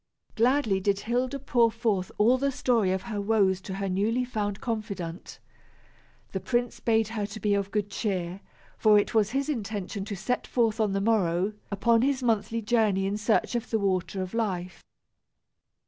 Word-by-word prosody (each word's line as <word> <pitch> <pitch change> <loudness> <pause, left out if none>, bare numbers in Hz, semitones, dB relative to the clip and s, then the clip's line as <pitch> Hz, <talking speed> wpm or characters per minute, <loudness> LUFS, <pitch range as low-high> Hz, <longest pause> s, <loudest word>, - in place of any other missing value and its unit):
Gladly 235 -4 +2
did 200 +1 0
Hilda 250 +4 -1
pour 245 -4 +3
forth 220 -5 -1
all 240 +5 +4
the 280 +1 +1
story 235 -7 +1
of 190 0 -1
her 215 -4 -3
woes 200 -3 +2
to 190 0 -6
her 195 0 -2
newly 215 +7 0
found 205 -5 -3
confidant. 200 -7 -5 0.9
The 190 - -2
prince 240 +5 -1
bade 225 -2 +2
her 215 -3 -3
to 210 +1 -8
be 205 0 +1
of 200 -1 0
good 205 -1 -2
cheer, 190 -2 -2 0.4
for 215 -1 +6
it 205 - +1
was 215 -2 +3
his 275 +3 -1
intention 210 -7 -3
to 205 -1 -4
set 250 +7 -2
forth 225 -2 +1
on 210 -3 +1
the 195 - 0
morrow 195 -2 +1 0.2
upon 225 +3 +3
his 265 0 +1
monthly 230 -1 0
journey 210 -4 +2
in 195 +1 -1
search 210 +3 +1
of 240 0 -2
the 225 - +1
water 185 -2 -1
of 185 - -8
life. 185 -6 -2
215 Hz, 180 wpm, -27 LUFS, 195-235 Hz, 0.9 s, for